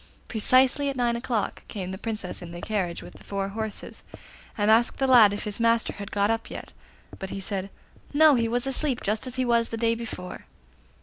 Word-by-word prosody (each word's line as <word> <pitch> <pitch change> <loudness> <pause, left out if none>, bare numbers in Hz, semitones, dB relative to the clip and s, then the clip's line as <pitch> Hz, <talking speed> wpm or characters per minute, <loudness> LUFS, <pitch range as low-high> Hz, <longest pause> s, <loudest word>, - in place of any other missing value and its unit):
Precisely 260 +5 +3
at 275 - -3
nine 240 -2 +1
o'clock 235 -3 -2
came 185 -3 -5
the 190 - -5
Princess 215 -5 -4
in 175 - -8
the 175 +1 -8
carriage 185 -4 -2
with - - -13
four 195 -1 -3
horses, 220 +1 -5 0.6
and 210 0 +3
asked 235 +2 +4
the 270 - +1
lad 240 -6 +7
if 205 - -3
his 210 +1 -4
master 230 0 +2
had 200 -1 -7
got 205 +1 +1
up 225 0 -2
yet; - - -8 0.5
but 190 - -5
he 195 - -5
said 195 0 -3 0.4
'No, 305 +1 +6
he 235 -3 +2
was 240 +2 -1
asleep, 270 -1 +1
just 215 +5 -1
as 255 - -6
he 255 -1 0
was 235 -1 +2
the 225 - -4
day 230 0 +2
before. 225 -6 -7
225 Hz, 205 wpm, -26 LUFS, 200-245 Hz, 0.6 s, lad